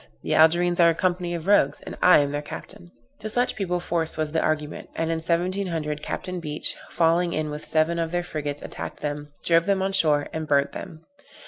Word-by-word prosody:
the - - -1
Algerines 175 +2 +4
are 170 -1 +7
a 165 - +1
company 175 -1 -1
of 165 -1 -6
rogues, 185 -8 +3
and - - -8
I 180 - +7
am 145 -1 +2
their 145 0 -2
captain." 85 -11 -9 0.3
To 215 +1 -5
such 245 +3 +1
people 180 -3 -1
force 165 -2 -2
was 155 -1 -1
the 160 - +1
argument; 150 -1 -2
and 165 0 -1
in 165 - 0
1700 170 -2 -1
Capt. 180 +3 -4
Beach, 150 -2 -2
falling 170 +1 +2
in 155 -1 -2
with 150 0 -6
seven 160 +2 +2
of 165 -1 -1
their 175 +1 -1
frigates, 145 -4 -4
attacked - - -7
them, 145 0 -4 0.2
drove 170 +1 +3
them 195 -1 +2
on 195 - 0
shore, 150 -6 +2
and 160 -1 -4
burnt 140 -1 +2
them. 160 0 -9
165 Hz, 210 wpm, -25 LUFS, 150-175 Hz, 0.3 s, are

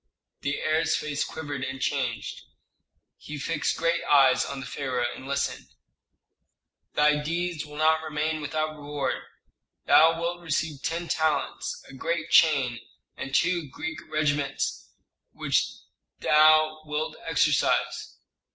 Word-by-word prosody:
The 140 0 -2
heir's 155 +1 +1
face 145 -1 -2
quivered 145 -4 -5
and 135 0 -4
changed. 130 -5 -2 0.8
He 150 - -8
fixed 150 +1 -1
great 170 +1 +1
eyes 135 -3 +5
on 140 - -5
the 135 - -6
pharaoh 130 -2 -2
and 130 - -10
listened. 140 - -2 1.3
"Thy 150 0 +4
deeds 170 0 -2
will 150 0 -10
not 160 +1 +3
remain 155 0 -2
without 155 +1 -2
reward. 145 -1 -3 0.6
Thou 165 +1 +6
wilt 175 +1 -2
receive 155 -3 -2
ten 170 +3 -2
talents, 155 -3 -1
a - - -13
great 160 +4 -3
chain, 135 -7 +4 0.4
and 135 0 -4
two 170 -5 +1
Greek 160 +4 -5
regiments 145 -2 -1 0.4
with - - -13
which - - +3 0.5
thou 155 0 +5
wilt 155 +1 -3
exercise." 150 -3 +1
150 Hz, 125 wpm, -26 LUFS, 140-160 Hz, 1.3 s, Thou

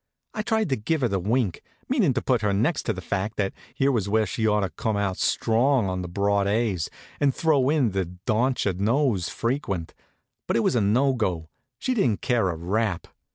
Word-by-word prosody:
I 215 - -2
tried 220 0 0
to 135 - +2
give 145 +8 -1
her 125 - +3
the 100 -3 -1
wink, 105 0 0 0.3
meanin' 210 - +2
to 130 - -1
put 125 -4 +1
her 105 -2 +1
next 120 - 0
to 110 - +2
the 95 -2 -8
fact 100 +5 -2
that 100 -2 0 0.2
here 135 +1 +2
was 105 -6 -1
where 110 +1 +2
she 110 +3 -1
ought 105 0 +2
to 95 - -2
come 110 -3 -2
out 100 -2 -1
strong 120 0 +2
on 95 0 -2
the 90 - -5
broad 100 +2 +1
A's, 100 -6 0 0.3
and 140 -2 +2
throw 145 -5 +2
in 145 -7 +2
the 95 -1 -1 0.2
dontcher 120 -3 +1
knows 105 - +1
frequent; 115 - -2 0.5
but - - +1
it - - +2
was 125 - +1
no 120 +6 +3
go. 90 -9 -2 0.3
She 255 - -1
didn't 125 - +1
care 120 -7 +1
a 85 - -2
rap. 95 +3 -1
110 Hz, 205 wpm, -25 LUFS, 100-130 Hz, 0.5 s, her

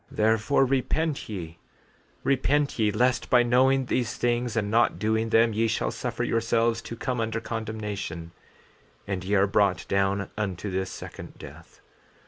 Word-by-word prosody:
14:19 - - -14
Therefore 110 +5 +3
repent 135 +3 -1
ye, 85 -5 -6 0.7
repent 140 +1 +1
ye, 110 -1 +3
lest 125 +4 +1
by 125 -1 +5
knowing 130 +2 +3
these 120 -1 -1
things 120 -1 0
and 105 -2 0
not 115 -5 +3
doing 110 +3 0
them 115 0 +4
ye 115 +2 +1
shall - - -1
suffer - - -3
yourselves 115 0 +1
to 115 - -7
come 125 +1 -2
under 115 0 -1
condemnation, 105 -7 -5 0.7
and 95 -2 -3
ye 100 +2 0
are 100 0 +5
brought 100 -2 +1
down 100 0 0
unto 100 -2 -3
this 95 0 -2
second - - -9
death. - - -13
110 Hz, 155 wpm, -26 LUFS, 100-120 Hz, 0.7 s, by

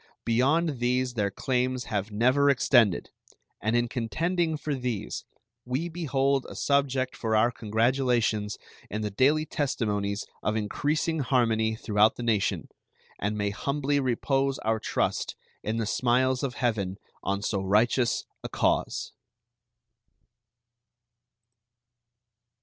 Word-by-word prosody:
Beyond 140 +5 +2
these 125 +1 +1
their 105 -4 0
claims 125 +3 -1
have 100 0 -2
never 130 +7 +3
extended, 120 -7 +3 0.5
and 110 +2 +1
in 120 0 +2
contending 160 +8 -1
for 150 0 -3
these 125 -6 -3 0.4
we 130 +8 -2
behold 140 -5 0
a - - -9
subject 135 -2 +1
for 110 -1 -1
our 115 +3 +4
congratulations 115 -2 +1 0.3
in 105 +2 -3
the 105 - -2
daily 145 +9 +3
testimonies 105 -9 -1 0.2
of 105 - 0
increasing 150 +9 0
harmony 115 -5 +2
throughout 110 -1 +3
the 120 - -6
nation, 110 -4 0 0.5
and 105 +2 -1
may 100 -1 0
humbly 140 +6 0
repose 135 +1 0
our 110 0 +1
trust - - -1 0.3
in 110 +2 -2
the 115 - 0
smiles 125 +3 +2
of 130 -3 -2
Heaven 100 -6 -1 0.2
on 100 +1 -2
so 100 -2 -1
righteous 110 +4 +2 0.2
a - - -4
cause. - - 0
120 Hz, 120 wpm, -27 LUFS, 110-135 Hz, 0.5 s, our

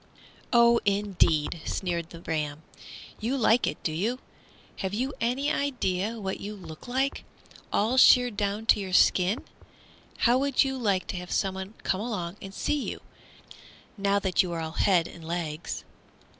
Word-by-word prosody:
"Oh, 235 -1 +6
indeed!" 195 -6 +1
sneered 170 -3 -2
the 170 - -11
ram, 155 -2 -3 0.6
"you 245 +5 -1
like 235 -1 +3
it, - - -2
do 160 - 0
you? 210 +11 -1 0.6
Have 190 +1 -3
you 260 +5 -1
any 255 +5 +1
idea 225 -6 -1
what 190 -2 -3
you 210 +1 -6
look 175 0 -11
like, 265 +3 -1 0.5
all 225 +5 +1
sheared 245 -3 +6
down 205 +1 -2
to 220 - +5
your 190 -2 -5
skin? 185 +6 +4 0.8
How 245 +2 +5
would 280 0 +3
you 265 -1 -2
like 200 -6 +1
to 190 - -3
have 180 0 -7
someone 190 +2 -2
come 190 - 0
along 200 -5 -4
and 195 - -8
see 285 +8 -1
you, - - -7 0.9
now 200 -1 +1
that 190 -3 +2
you 180 -2 -3
are 165 - -3
all 160 -1 -4
head 175 0 +2
and 170 - -12
legs?" 165 -1 -4
200 Hz, 160 wpm, -27 LUFS, 175-235 Hz, 0.9 s, Oh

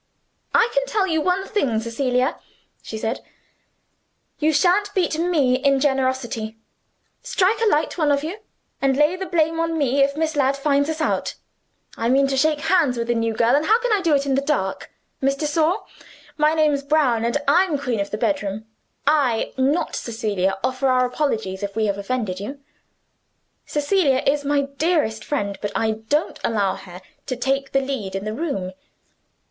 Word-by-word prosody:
"I 460 - +5
can - - +2
tell 415 -5 +1
you 320 -4 0
one 365 +4 0
thing, 265 - 0
Cecilia," 250 +4 -1 0.4
she 220 - -7
said; 225 +3 -2 1.2
"you 310 +1 +3
shan't 370 +7 +2
beat 340 -4 +1
ME 300 -8 +2
in 275 0 +2
generosity. 260 -5 -1 0.6
Strike 400 +4 +1
a 455 - +3
light, 310 +2 0
one 300 -2 +3
of 280 0 +1
you, 350 +7 -5 0.4
and 270 -1 +2
lay 300 +4 +3
the 380 0 -5
blame 325 -1 +1
on 330 0 0
me 280 -2 +2
if 280 +1 +2
Miss 315 0 -1
Ladd 275 -1 +2
finds 285 +1 +1
us 320 0 -3
out. - - -1 0.6
I 230 +1 0
mean 275 +2 +4
to 270 - 0
shake 300 +2 +2
hands 320 -9 +2
with 235 0 -3
the - - +4
new 230 -1 -1
girl 235 +2 +3
and 295 +2 +1
how 445 +3 +5
can - - -1
I 410 - +2
do 330 -5 +3
it 280 0 0
in 275 - 0
the 270 - +2
dark? 275 -10 -2 0.3
Miss 275 +1 +2
de 300 - -3
Sor, 320 +6 +1 0.5
my 305 +1 +2
name's 300 -3 +2
Brown, 280 -6 +2
and 235 +4 +1
I'm 335 +1 +3
queen 250 -5 -2
of 200 - -2
the 210 - -3
bedroom. 215 -5 -1 0.4
I 280 -6 +2
not 285 +6 0
Cecilia 200 -4 -1
offer 255 +1 0
our 255 -1 +3
apologies 220 -8 -2
if 200 -1 -4
we 220 -1 +1
have 200 -1 -1
offended 205 -4 -2
you. 240 +8 -6 1.1
Cecilia 290 -3 +1
is 285 +1 +2
my 285 0 +2
dearest 280 -5 0
friend, 200 -9 -2
but 205 - -3
I 225 -1 +1
don't 220 +9 -2
allow 205 -4 +1
her 180 0 -11 0.3
to 255 - -2
take 270 +2 -1
the 270 - +2
lead 260 -9 -4
in 195 +1 -4
the 215 - -3
room. 225 - -3
275 Hz, 185 wpm, -22 LUFS, 230-310 Hz, 1.2 s, I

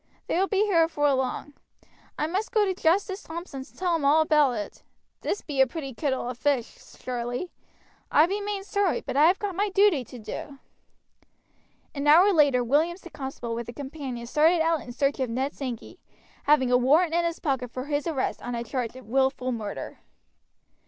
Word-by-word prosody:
They - - 0
will 385 - +2
be 405 +1 +2
here 365 -6 +3
afore 290 -3 +1
long. 265 +2 -2 0.6
I - - 0
must 380 +7 -2
go 430 -3 +3
to 380 - 0
Justice 380 +3 +1
Thompson's 320 -5 -8
and - - -25
tell 360 -2 +1
him 320 - -2
all 295 +3 +5
about 300 -4 +3
it. 210 -3 -6 0.4
This 410 - -2
be 280 -3 0
a 265 - +5
pretty 275 -2 -6
kittle 260 -1 -2
of 250 0 -6
fish, 275 -5 -2
surely. 245 +7 -4 0.6
I 305 - +6
be 400 +4 -2
main 405 -1 -3
sorry, 395 -1 0
but - - -5
I 295 +3 +6
have 365 +3 +3
got 410 -2 -3
my 405 +3 0
duty 390 -8 +3
to 250 - -11
do." 235 +5 -7 1.4
An 285 -1 -3
hour 355 +7 +7
later 285 -6 +4
Williams 320 +9 +1
the 345 - -12
constable 265 -4 -5
with 235 0 -5
a - - -6
companion 270 -4 -6
started 315 +7 +3
out 325 -1 +1
in 245 - -9
search 275 +3 0
of 260 -2 -1
Ned 265 +5 -2
Sankey, 255 -4 -6 0.5
having 275 -4 +4
a 250 - +6
warrant 310 +7 +3
in 340 0 +2
his 335 0 -1
pocket 265 -4 -2
for 255 +2 -6
his 290 +2 -2
arrest 290 -6 -2
on 245 - -5
the 235 0 -2
charge 240 0 -3
of 260 - -11
willful 265 +2 +1
murder. 215 -4 -5
290 Hz, 200 wpm, -26 LUFS, 255-340 Hz, 1.4 s, hour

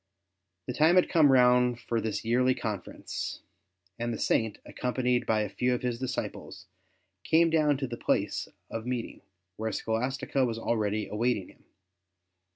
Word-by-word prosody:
The 125 - -4
time 155 +6 +4
had 185 - +4
come 155 -5 +5
round 125 -1 +4
for 115 -2 -2
this 110 0 -3
yearly 125 +2 +3
conference, 110 -6 -5 0.6
and 120 0 -1
the 115 - -3
Saint, 110 -2 +1
accompanied 125 0 -1
by 110 -1 +2
a 105 - -1
few 125 +6 0
of 125 - -6
his 120 -2 -1
disciples, 130 -7 -5 0.6
came 165 +1 +4
down 150 -3 +3
to 135 - -2
the 120 -1 -6
place - - 0 0.2
of 115 +1 -5
meeting, 125 -2 -4 0.4
where 110 +1 -2
Scholastica 125 +5 -1
was 115 -3 -1
already 110 -2 -1
awaiting 110 -2 -1
him. - - -21
125 Hz, 155 wpm, -29 LUFS, 110-130 Hz, 0.6 s, come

